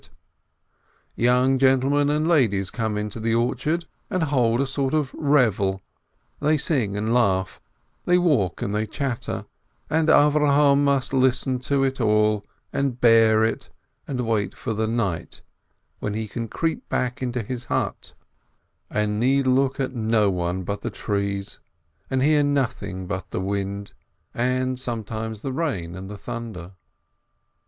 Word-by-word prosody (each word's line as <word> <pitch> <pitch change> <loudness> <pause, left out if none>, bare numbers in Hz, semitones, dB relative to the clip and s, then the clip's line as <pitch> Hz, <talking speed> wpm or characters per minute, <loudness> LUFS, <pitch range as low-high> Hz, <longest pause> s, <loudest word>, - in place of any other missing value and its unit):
tf - - -18 1.1
Young 125 +2 +3
gentlemen 135 +2 +3
and 150 +1 +1
young - - +1
ladies 100 - +2
come 110 -3 -2
into 105 +1 -4
the 115 +1 0
orchard, 150 +8 0 0.2
and 185 -2 0
hold 125 -6 +2
a 140 - +2
sort 135 +1 -1
of 150 -4 -1
revel; 105 - +2 0.6
they 155 +1 +2
sing 120 -10 0
and 110 +3 0
laugh, 95 -6 +1 0.4
they 180 - +4
walk 140 - +1
and 100 - -2
they 110 +1 -1
chatter, 130 +1 -3 0.5
and 160 +1 +2
Avrohom 145 -1 +5
must 140 -1 +1
listen 130 0 +2
to 135 +2 0
it 135 -1 -1
all, 105 -1 +2 0.3
and 135 -3 -1
bear 115 -2 +5
it, 110 - -1 0.4
and 125 -3 -2
wait 110 -3 -1
for 115 - -3
the 110 +1 -1
night, 110 -7 -3 0.6
when 105 - -3
he 110 0 -3
can 115 +2 -5
creep 160 +8 -3
back 125 0 -1
into 125 -2 -2
his 125 +3 -5
hut, - - -3 0.7
and 105 0 -1
need 135 +3 +2
look 130 +1 +2
at 130 -1 -1
no 110 -3 +2
one 90 +1 -2
but 100 +3 -4
the - - -3
trees, 100 -1 -3 0.5
and 130 -1 +1
hear 150 +1 +4
nothing 130 -10 -1
but 95 -1 -5
the - - -3
wind, 100 +1 -3 0.4
and 130 +1 0
sometimes 110 -3 -4
the 135 - -3
rain 110 - -2
and 95 +1 -8
the 105 - -7
thunder. 110 -6 -7
120 Hz, 150 wpm, -24 LUFS, 105-135 Hz, 1.1 s, Avrohom